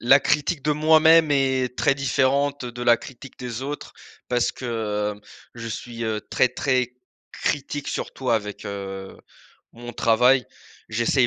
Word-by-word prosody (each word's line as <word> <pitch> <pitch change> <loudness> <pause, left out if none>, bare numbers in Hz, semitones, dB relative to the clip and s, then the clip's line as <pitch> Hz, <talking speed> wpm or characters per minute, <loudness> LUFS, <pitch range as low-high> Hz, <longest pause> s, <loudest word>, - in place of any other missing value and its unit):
la 135 +4 +6
critique 150 0 0
de 150 - +1
moi-même 160 +1 +5
est 130 -2 +1
très 140 - +3
différente 140 +1 +1
de 120 0 -7
la 120 -1 +5
critique 130 +2 -12
des 125 -1 -5
autres 145 +2 -6 0.4
parce 120 -1 +1
que, 130 - -10 0.5
heu, - - -19 0.3
je 115 -1 -7
suis, 115 +1 -6
heu, 110 -1 -1
très - - +4
très 125 -1 0 0.4
critique 145 0 -2
surtout 130 -2 -3
avec, 105 -3 -1
heu, 95 -1 -6 0.6
mon 120 0 -9
travail. 125 +4 +3 0.4
J'essaye 120 +3 +2
125 Hz, 145 wpm, -23 LUFS, 120-140 Hz, 0.6 s, la